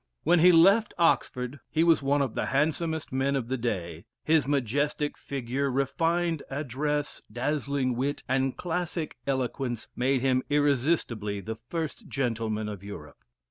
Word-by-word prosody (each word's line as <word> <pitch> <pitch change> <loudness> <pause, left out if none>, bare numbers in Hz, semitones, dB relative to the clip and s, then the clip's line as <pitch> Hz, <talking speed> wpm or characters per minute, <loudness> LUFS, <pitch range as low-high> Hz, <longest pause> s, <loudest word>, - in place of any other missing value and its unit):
When 175 +2 +4
he 180 +2 +8
left 195 +6 +5
Oxford, 140 -5 +1
he 160 +1 +2
was 165 -3 +4
one 140 +1 +2
of 130 - -3
the - - -2
handsomest 160 +2 0
men 135 +1 +1
of 125 -3 -2
the 130 - 0
day 90 -9 -3 0.2
his 155 -4 +3
majestic 145 +2 0
figure, 135 +1 -2
refined 165 +5 0
address, 145 +1 -2
dazzling 135 +1 -1
wit, 140 +4 -2
and 135 0 0
classic 175 -2 -3
eloquence, 130 -3 -2
made 130 +1 +1
him 130 -1 +2
irresistibly 140 -7 +1
the 110 +3 -5
"first 165 +5 -4
gentleman 115 -6 -1
in 105 -2 -5
Europe." 90 -7 -10
140 Hz, 140 wpm, -28 LUFS, 125-155 Hz, 0.2 s, he